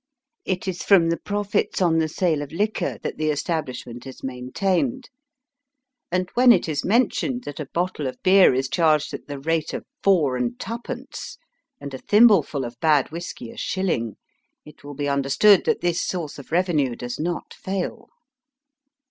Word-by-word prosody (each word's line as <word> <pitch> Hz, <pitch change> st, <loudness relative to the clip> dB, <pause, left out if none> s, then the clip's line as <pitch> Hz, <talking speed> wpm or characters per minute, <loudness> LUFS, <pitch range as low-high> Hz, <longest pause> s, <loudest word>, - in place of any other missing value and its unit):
It 185 Hz, 0 st, -2 dB
is 185 Hz, -2 st, -3 dB
from 175 Hz, -5 st, +5 dB
the 170 Hz, -, 0 dB
profits 205 Hz, 0 st, -1 dB
on 170 Hz, -3 st, +3 dB
the 160 Hz, -, +1 dB
sale 160 Hz, -1 st, 0 dB
of 145 Hz, -1 st, -7 dB
liquor 210 Hz, +6 st, -1 dB
that -, -, -4 dB
the 155 Hz, 0 st, +1 dB
establishment 135 Hz, -5 st, -3 dB
is 130 Hz, -, -11 dB
maintained, 185 Hz, -, -2 dB, 1.0 s
and 180 Hz, +1 st, 0 dB
when 250 Hz, 0 st, +6 dB
it 190 Hz, -7 st, +3 dB
is 150 Hz, -3 st, -2 dB
mentioned 245 Hz, +3 st, +1 dB
that 145 Hz, -, -7 dB
a 150 Hz, -, -5 dB
bottle 175 Hz, -5 st, -1 dB
of 130 Hz, -, -5 dB
beer 190 Hz, 0 st, +7 dB
is 130 Hz, +1 st, 0 dB
charged 155 Hz, 0 st, +2 dB
at -, -, -7 dB
the 145 Hz, -1 st, -5 dB
rate 160 Hz, +3 st, -1 dB
of -, -, -6 dB, 0.2 s
four 155 Hz, -10 st, +3 dB
and 120 Hz, -1 st, -2 dB
twopence, 240 Hz, +3 st, -6 dB, 0.4 s
and 140 Hz, -, -8 dB
a 130 Hz, -, -5 dB
thimbleful 205 Hz, -, +4 dB
of 120 Hz, 0 st, -9 dB
bad 150 Hz, -4 st, +3 dB
whisky 165 Hz, -8 st, -7 dB
a -, -, -13 dB
shiUing, 165 Hz, -, -1 dB, 0.5 s
it 150 Hz, -, -15 dB
will 145 Hz, 0 st, -8 dB
be 145 Hz, +1 st, -2 dB
understood 140 Hz, +9 st, +4 dB
that -, -, +1 dB
this 175 Hz, -1 st, 0 dB
source 165 Hz, -6 st, -4 dB
of 140 Hz, -, -13 dB
revenue 160 Hz, -8 st, +1 dB
does 120 Hz, 0 st, -6 dB
not 170 Hz, +2 st, -3 dB
fail. 190 Hz, -1 st, -4 dB
165 Hz, 170 wpm, -23 LUFS, 140-190 Hz, 1.0 s, beer